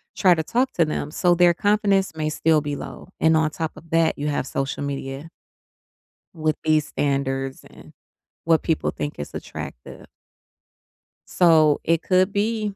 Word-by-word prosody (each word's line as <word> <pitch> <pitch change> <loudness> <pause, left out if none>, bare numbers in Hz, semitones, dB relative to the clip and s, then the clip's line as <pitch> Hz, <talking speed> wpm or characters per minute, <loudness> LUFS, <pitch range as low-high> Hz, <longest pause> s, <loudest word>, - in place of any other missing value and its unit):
try 185 -3 +4
to 160 - -2
talk 250 +9 0
to 165 - +2
them, 150 -1 -4
so 175 +1 +2
their 175 0 +5
confidence 200 0 +1
may 155 -1 -2
still 155 0 +2
be 145 -1 -3
low. - - -9
And 160 0 +4
on 155 -1 +2
top 160 0 -3
of 165 +2 -14
that, 165 -1 +2
you 145 - -3
have 145 -3 -1
social 135 +1 -3
media 140 +2 -5 1.0
with 155 -2 0
these 155 -1 +2
standards 135 -1 -2
and - - -16 0.5
what 165 -1 +2
people 160 - 0
think 145 - -5
is 75 - -7
attractive. - - -8 1.2
So, 160 -4 +4
it 165 0 +1
could 185 +2 +2
be, 210 0 -1
160 Hz, 160 wpm, -23 LUFS, 145-175 Hz, 1.2 s, their